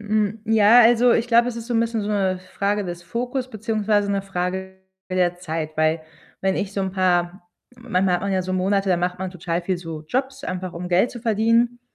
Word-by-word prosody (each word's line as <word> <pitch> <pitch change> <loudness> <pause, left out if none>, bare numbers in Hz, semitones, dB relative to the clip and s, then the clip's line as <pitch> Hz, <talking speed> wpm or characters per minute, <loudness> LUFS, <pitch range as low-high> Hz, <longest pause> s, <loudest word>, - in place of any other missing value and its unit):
Hm, 215 0 -1
ja, 225 +1 +6
also 240 +1 +5
ich 235 +1 +1
glaube, 235 +1 +4
es 235 - -5
ist 230 - -7
so 240 - -3
'n 225 - +3
bisschen 230 -1 -1
so 205 - -4
'ne 190 -3 0
Frage 205 +1 0
des 175 -1 -6
Fokus 250 +7 -3
beziehungsweise 215 -2 0
'ne 200 -1 0
Frage 190 0 -4 0.3
der 180 -1 +1
Zeit. 160 -3 -5
Weil 155 +1 +1 0.4
wenn 190 0 0
ich 195 -1 -3
so 200 - -2
'n 190 -1 -1
paar 180 -1 +1 0.4
manchmal 195 -6 0
hat 175 - 0
man 200 0 -1
ja 185 -1 +1
so 185 - -4
Monate, 195 +2 +1
da 180 - +3
macht 180 +1 -2
man 190 0 -4
total 175 -1 -2
viel 180 +1 -2
so 165 -3 -7
Jobs, 265 - -2
einfach 185 0 -4
um 180 +1 -5
Geld 185 +7 +3
zu 240 - -8
verdienen. 230 +2 +2
195 Hz, 220 wpm, -22 LUFS, 180-225 Hz, 0.4 s, ja